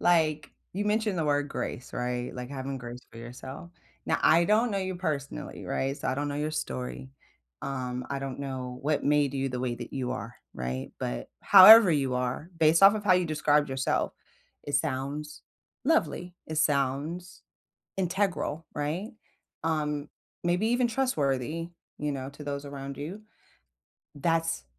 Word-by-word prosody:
like, 155 -4 +2 0.2
you 200 +3 -2
mentioned 210 -3 +1
the 160 - +1
word 145 -1 +1
"grace," 130 -2 -5
right? 125 0 -3
Like, 125 +1 -6
having 135 0 -4
grace 120 0 -8
for 115 - -12
yourself. 130 +7 -9 0.4
Now, - - +2
I 170 +2 +6
don't 220 +6 +3
know 200 - 0
you 190 -1 -2
personally, 150 - -4
right? 135 +1 -1
So, - - -5
I - - +1
don't 145 +2 -2
know 145 - -3
your 150 +1 -2
story. 130 -3 -4 0.5
Um, 125 -2 -3
I 140 - -1
don't 135 -1 -5
know 130 -3 -5
what 150 +1 +1
made 145 -1 +3
you 135 0 0
the 125 -1 -4
way 125 -1 -1
that 120 -1 -8
you 130 -2 -2
are, 120 -1 -6 0.2
right? 65 +1 -4
But, - - -4
however 205 +1 +10
you 135 -5 +1
are, 125 +5 -2
based 160 +2 +4
off 195 +2 +9
of 210 -1 -4
how 190 - +5
you 180 0 +3
described 150 -2 +2
yourself, 135 0 0 0.5
it 145 -1 0
sounds 145 +1 -3 0.4
lovely, 250 - +1
it 155 - -5
sounds 150 +5 0 0.6
integral, 180 -4 -1
right? 160 - -2 0.5
Um, 150 -2 -1 0.3
maybe 180 +5 +2
even 245 0 +3
trustworthy, 165 - -1 0.3
you 150 -1 -1
know, 135 -1 -4
to 150 +1 -10
those 140 0 -4
around 140 -1 -7
you. 170 +9 -6 1.0
That's 165 - 0
145 Hz, 160 wpm, -28 LUFS, 130-170 Hz, 1.0 s, however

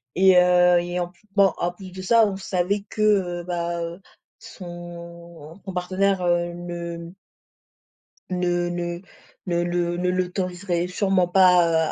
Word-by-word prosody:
et 190 0 +5
heu, 180 0 +5
et 175 +1 -3
en 175 - -1
pl 175 - -27
bon 200 -1 +5
en 175 - -1
plus 185 +1 -12
de 185 +1 -8
ça, 225 +2 +5
on 195 - -3
savait 195 +1 -1
que, 215 - -5
heu, 185 -5 +2
bah, 170 -1 -3
heu, 170 +2 -5 0.4
son 170 -1 -11
son 190 - -6
partenaire, 185 +1 0
heu, 175 0 +1
ne 170 -1 -6 1.2
ne 175 -1 0
ne 175 0 -4 0.4
ne 175 -1 0
le 175 0 -1
ne 180 +1 0
l'autoriserait 180 -1 -2
sûrement 185 -1 +1
pas, 175 -3 +4
175 Hz, 145 wpm, -23 LUFS, 175-185 Hz, 1.2 s, et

